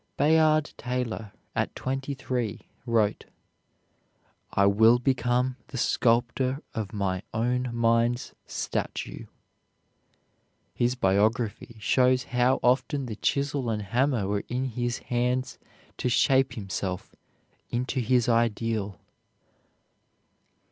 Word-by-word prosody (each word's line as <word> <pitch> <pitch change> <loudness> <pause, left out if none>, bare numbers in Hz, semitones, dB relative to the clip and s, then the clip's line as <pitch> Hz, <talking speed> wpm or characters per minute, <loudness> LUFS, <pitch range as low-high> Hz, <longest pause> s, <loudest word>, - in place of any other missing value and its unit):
Bayard 155 +1 +4
Taylor, 120 -4 -3 0.2
at - - -1
twenty 135 +2 -3
three, 125 -5 -3 0.3
wrote: 110 -3 +1 1.3
"I 100 - +3
will 110 +4 +6
become 125 0 +1
the 145 -4 -7
sculptor 125 +3 +1
of 105 -3 -4
my 95 -3 -1
own 125 +3 0
mind's 115 +1 +1
statue." - - -4 1.5
His 120 +1 +1
biography 110 +2 +1
shows 125 +3 +3
how 125 +2 +3
often 135 +3 +2
the 115 -3 -5
chisel 140 -2 0
and 105 -2 -1
hammer 120 +1 +1
were 100 0 -1
in 125 +2 -1
his 120 0 -2 0.2
hands 125 +1 0 0.4
to 125 - -1
shape 135 +2 +3
himself 95 -4 -4 0.5
into 125 +2 -1
his 125 0 +2
ideal. 115 -3 0
120 Hz, 100 wpm, -27 LUFS, 110-130 Hz, 1.5 s, will